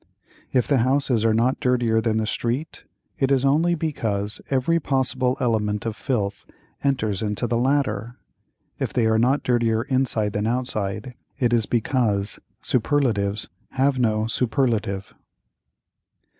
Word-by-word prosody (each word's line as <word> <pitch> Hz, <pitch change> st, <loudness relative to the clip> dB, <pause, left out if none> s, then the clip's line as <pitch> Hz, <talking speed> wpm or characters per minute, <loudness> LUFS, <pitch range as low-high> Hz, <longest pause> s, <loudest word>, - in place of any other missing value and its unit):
If 125 Hz, -2 st, +2 dB
the 140 Hz, -3 st, +3 dB
houses 130 Hz, -2 st, +2 dB
are 115 Hz, -1 st, +3 dB
not 120 Hz, +4 st, +2 dB
dirtier 120 Hz, -5 st, +2 dB
than 110 Hz, -1 st, 0 dB
the 110 Hz, -, 0 dB
street, 120 Hz, +7 st, -3 dB, 0.3 s
it 135 Hz, 0 st, +2 dB
is 135 Hz, -1 st, +3 dB
only 160 Hz, +5 st, +3 dB
because 110 Hz, -10 st, -2 dB
every 140 Hz, +5 st, +2 dB
possible 130 Hz, -3 st, 0 dB
element 105 Hz, -3 st, 0 dB
of 115 Hz, -2 st, -2 dB
filth 105 Hz, -8 st, -2 dB, 0.4 s
enters 120 Hz, -8 st, 0 dB
into 105 Hz, +1 st, -1 dB
the 115 Hz, 0 st, 0 dB
latter; 125 Hz, -4 st, 0 dB, 0.6 s
if -, -, -2 dB
they 120 Hz, -, +1 dB
are 110 Hz, 0 st, +3 dB
not 130 Hz, +5 st, +2 dB
dirtier 115 Hz, -2 st, +1 dB
inside 130 Hz, -6 st, 0 dB
than 105 Hz, +1 st, -1 dB
outside, 115 Hz, -2 st, -2 dB, 0.2 s
it 120 Hz, -4 st, +1 dB
is 115 Hz, -2 st, +2 dB
because 110 Hz, -4 st, 0 dB, 0.2 s
superlatives 110 Hz, -6 st, +1 dB, 0.3 s
have 135 Hz, 0 st, +2 dB
no 110 Hz, -3 st, +1 dB
superlative. 115 Hz, -5 st, -1 dB
120 Hz, 135 wpm, -23 LUFS, 110-130 Hz, 0.6 s, the